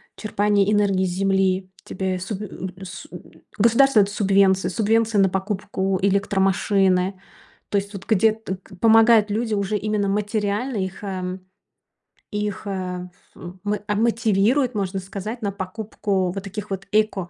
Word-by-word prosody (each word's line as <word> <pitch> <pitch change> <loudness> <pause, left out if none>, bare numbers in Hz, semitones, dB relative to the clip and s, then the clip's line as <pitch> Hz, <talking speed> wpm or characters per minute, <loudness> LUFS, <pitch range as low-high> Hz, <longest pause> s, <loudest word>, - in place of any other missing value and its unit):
черпания 205 -1 +1
энергии 200 -3 +2
с - - -1
земли. 190 0 +1
Тебе 185 -1 -3
суб 195 +2 -5
э, - - -4 0.3
э, 190 - -9
су 180 - -9 0.5
государство 235 +2 +5
дает 200 - +1
субвенцию, 195 -2 +3
субвенция 225 0 +2
на 195 - +4
покупку 190 0 -2
электромашины. 195 -1 +2 0.5
То 205 - +1
есть 200 +1 -3
вот, 195 -1 -8
где 220 0 +3
т 220 -4 -6
к 190 - -15
помогают 225 -1 +6
люди 225 +1 -1
уже 200 +1 0
именно 210 -1 -1
материально. 210 +4 -1
Их, 190 +1 -4
э, 185 -1 -4 0.9
их, 210 0 -3
э, 180 -2 -4
ф 180 +1 -21
у 175 0 -9
мо 205 0 -1
а, 210 - 0
мотивируют, 230 +3 +2
можно 195 -1 -2
сказать, 200 +5 -6
на 200 -2 -1
покупку 195 -1 -2
вот 195 -1 -5
таких 205 +1 -7
вот 195 0 -4
эко. 210 -4 +1
200 Hz, 155 wpm, -22 LUFS, 190-215 Hz, 0.9 s, помогают